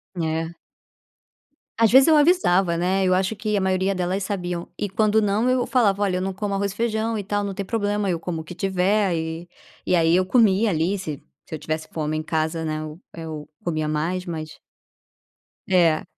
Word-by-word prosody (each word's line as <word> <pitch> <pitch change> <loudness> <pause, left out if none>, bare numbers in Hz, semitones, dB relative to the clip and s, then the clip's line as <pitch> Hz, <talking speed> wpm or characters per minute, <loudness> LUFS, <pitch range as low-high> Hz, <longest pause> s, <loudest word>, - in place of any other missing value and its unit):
É. 165 0 -2 1.2
Às 225 -2 +4
vezes 265 +4 +7
eu 315 - +6
avisava, 195 - +3
né. 185 +3 +1
Eu 185 - +3
acho 190 +3 +1
que 210 +1 -2
a 200 - +1
maioria 190 +1 +1
delas 185 +2 -1
sabiam. 180 -3 -3
E, 205 - -2
quando 215 +2 +2
não, 210 +3 +1
eu 255 -1 +1
falava: 205 -6 +2
"Olha, 185 -3 +1
eu - - -2
não 190 +1 -2
como 200 +1 -3
arroz 200 0 -1
e - - -12
feijão 225 0 -1
e 205 - -3
tal 205 +1 -1
não 200 - -3
tem 200 - -4
problema 205 -1 -1
eu 170 -2 -1
como 165 -1 -4
o - - -10
que 165 +3 -10
tiver". 180 -3 0 0.4
E 180 - +2
aí, 165 0 +4
eu 185 +1 +3
comia, 210 0 +3
ali, 175 +4 0
se 155 -5 -6 0.2
se - - -6
eu - - -7
tivesse 155 +1 -4
fome, 155 -1 -2
em 155 - -3
casa, 160 +1 -1
né, 155 0 -2
eu 155 +2 -8
eu 155 -3 -7 0.2
comia 155 -3 -1
mais, 165 +4 -2
mas 155 -3 -6 1.1
É, 170 -4 +3
185 Hz, 200 wpm, -23 LUFS, 165-205 Hz, 1.2 s, vezes